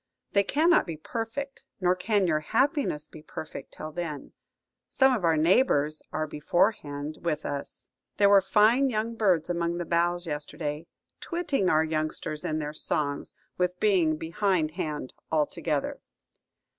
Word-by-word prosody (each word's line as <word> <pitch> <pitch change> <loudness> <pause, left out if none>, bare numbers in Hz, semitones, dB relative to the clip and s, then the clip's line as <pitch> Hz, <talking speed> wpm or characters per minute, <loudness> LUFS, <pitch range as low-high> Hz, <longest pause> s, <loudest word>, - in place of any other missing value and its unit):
They 200 - +4
cannot 325 - +3
be 165 -2 -5
perfect, 235 - -5 0.2
nor 180 -1 +3
can 200 +2 +1
your 155 -3 +2
happiness 230 - 0
be 155 - -12
perfect, 155 0 -8
till 155 - -6
then. 155 -4 -5 0.6
Some 265 -1 +4
of 210 - -4
our 165 -2 +3
neighbours 155 - +3
are 155 0 -1
beforehand 150 -2 -1
with 155 -3 -2
us. 140 -1 -6 0.3
There 200 - +5
were 200 -1 +7
fine 220 +8 +4
young 225 0 -1
birds 190 -8 +2
among 170 -1 -1
the 175 - -3
boughs 175 +1 +1
yesterday, 150 0 -4 0.3
twitting 305 - 0
our 155 0 +4
youngsters 155 -1 -2
in 155 - -1
their 150 -1 -3
songs 145 -2 -2 0.3
with 180 0 0
being 180 -7 +3
behindhand 165 -5 -1 0.2
altogether." 150 -1 -1
170 Hz, 140 wpm, -27 LUFS, 155-210 Hz, 0.6 s, were